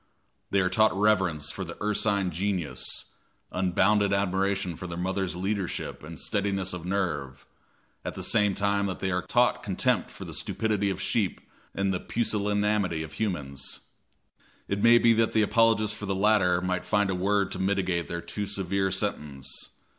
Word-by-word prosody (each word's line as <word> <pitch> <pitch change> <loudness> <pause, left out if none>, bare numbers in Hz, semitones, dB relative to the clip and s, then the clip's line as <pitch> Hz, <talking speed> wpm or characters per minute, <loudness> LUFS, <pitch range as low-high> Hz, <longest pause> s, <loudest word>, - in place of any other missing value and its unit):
They 100 - +3
are 95 - +2
taught 110 +1 +3
reverence 95 -8 +2
for 95 - -5
the 85 -1 -8
ursine 105 -2 +1
genius, 90 -7 -3 0.5
unbounded 100 +3 +2
admiration 95 -2 0
for 90 - -7
their 85 -1 -6
mother's 95 -1 -1
leadership 95 0 -3
and 80 +2 -8
steadiness 100 -3 -1
of 90 -1 -6
nerve, 90 -9 -2 0.6
at - - -5
the - - -4
same 105 -2 +3
time 100 0 +1
that 95 - -3
they 95 - -2
are 90 0 0
taught 125 +3 +2
contempt 95 -3 +1
for - - -9
the - - -8
stupidity 105 -2 0
of 95 - -3
sheep 105 -6 0 0.4
and 95 0 +1
the 90 - -1
pusillanimity 105 -6 0
of 80 -1 -9
humans. 75 -8 -4 0.9
It 100 0 -1
may 120 +2 +7
be 115 -1 +5
that 115 0 +1
an 110 - +5
apologist 110 -1 +3
for 105 - -6
the 95 - 0
latter 95 -3 +3
might 90 0 -1
find 105 -2 +1
a - - 0
word 100 +1 +1
to - - -3
mitigate 95 -3 0
their 85 0 -4
too 100 +5 -4
severe 95 -1 0
sentence. 70 -6 -3
95 Hz, 170 wpm, -27 LUFS, 90-105 Hz, 0.9 s, may